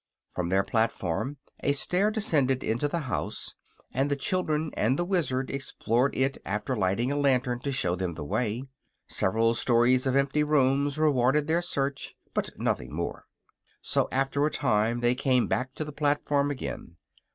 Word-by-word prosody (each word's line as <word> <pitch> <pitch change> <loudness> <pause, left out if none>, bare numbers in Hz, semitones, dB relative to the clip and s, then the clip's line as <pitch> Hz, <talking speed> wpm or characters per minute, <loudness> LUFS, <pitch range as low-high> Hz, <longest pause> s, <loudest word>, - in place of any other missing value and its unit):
From 90 -1 -2
their 95 +1 +3
platform 110 - -1 0.2
a 140 - +1
stair 180 +8 +1
descended 145 - +1
into 120 +6 0
the 170 +3 -2
house, 130 -4 -3 0.4
and 135 +2 +1
the 145 - +2
children 155 -1 -1
and 130 +6 +1
the 175 - 0
Wizard 150 -9 0
explored 135 -1 0
it 135 +1 +1
after 105 +6 -2
lighting 105 +5 +1
a - - 0
lantern 130 -3 +2
to 140 +3 -3
show 90 -10 0
them 90 -2 -3
the 75 - -6
way. 115 - -1 0.4
Several 115 +4 +2
stories 120 +2 +3
of 130 - +1
empty 140 +2 +2
rooms 140 -1 +2
rewarded 145 -1 +3
their 165 +3 +1
search, 140 -5 -2 0.2
but - - -1
nothing - - -1
more; - - -4 0.5
so - - +1
after 135 +2 +1
a 150 - +3
time 120 -5 +1
they 120 0 +3
came 130 -1 +2
back 130 +1 -2
to 155 - -3
the 150 - -6
platform 145 -1 +1
again. 130 -10 -5
135 Hz, 165 wpm, -28 LUFS, 120-145 Hz, 0.5 s, their